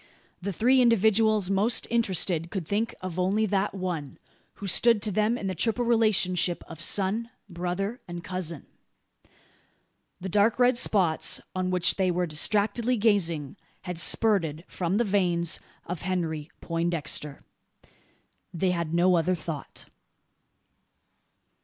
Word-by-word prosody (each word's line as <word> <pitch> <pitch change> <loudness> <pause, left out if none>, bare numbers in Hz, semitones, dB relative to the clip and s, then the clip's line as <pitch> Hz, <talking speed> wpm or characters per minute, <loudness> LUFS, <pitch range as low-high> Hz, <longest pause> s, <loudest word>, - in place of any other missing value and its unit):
The 200 +2 -3
three 250 +8 +3
individuals 220 -3 +3
most 205 +5 +2
interested 185 -7 +1
could 185 -5 -5
think 215 +4 -1
only 185 +4 0
of 215 - -2
that 200 0 0
one, 175 -7 -4 0.4
who 205 - -8
stood 230 +4 +3
to 215 - -2
them 215 +4 +1
in 200 - -6
the 190 - -1
triple 230 +7 0
relationship 195 -6 +1
of 165 -1 -10
son, 205 +6 0 0.2
brother, 185 +6 -4
and 175 0 -7
cousin. 175 -5 -5 1.5
The 190 - -6
dark 205 +4 +2
red 250 0 +4
spots 190 -9 +2 0.2
on 185 0 -1
which 180 -2 +1
they 190 -2 +1
were 180 0 0
distractedly 210 +9 +2
gazing 180 - +1 0.3
had 180 -3 -4
spurted 170 -6 +1
from 180 +2 -2
the 235 - +2
veins 180 -5 +1 0.3
of 170 -2 -5
Henry 165 -4 -3
Poindexter. 165 -4 -2 1.1
They 180 +1 0
had 170 -2 -2
no 180 +1 +4
other 175 +3 +1
thought. 160 -3 -7
185 Hz, 130 wpm, -26 LUFS, 170-215 Hz, 1.5 s, red